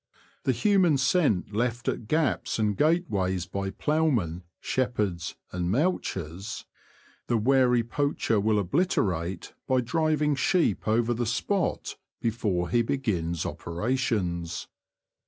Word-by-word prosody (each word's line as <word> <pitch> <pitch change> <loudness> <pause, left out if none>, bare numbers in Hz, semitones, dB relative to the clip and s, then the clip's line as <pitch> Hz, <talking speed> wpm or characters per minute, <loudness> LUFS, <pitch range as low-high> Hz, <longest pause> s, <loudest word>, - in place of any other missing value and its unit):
The - - +4
human 190 -8 +3
scent 135 - +2
left 120 +2 -1
at 110 - -2
gaps 155 0 0
and 105 -2 +1
gateways 100 - +1
by 95 +2 -3
ploughmen, 125 - 0 0.2
shepherds, 105 -9 -1 0.2
and 90 -1 -2
mouchers, 100 - -2 0.6
the 120 - +2
wary 125 0 +3
poacher 120 -3 0
will 105 +1 +2
obliterate 95 - 0
by 130 -1 +3
driving 155 +2 +1
sheep 140 - +1
over 115 +2 +2
the 120 0 -2
spot 175 - -1 0.2
before 105 -7 -1
he 120 - +4
begins 90 - -1
operations. 90 -4 -2
115 Hz, 110 wpm, -27 LUFS, 95-140 Hz, 0.6 s, The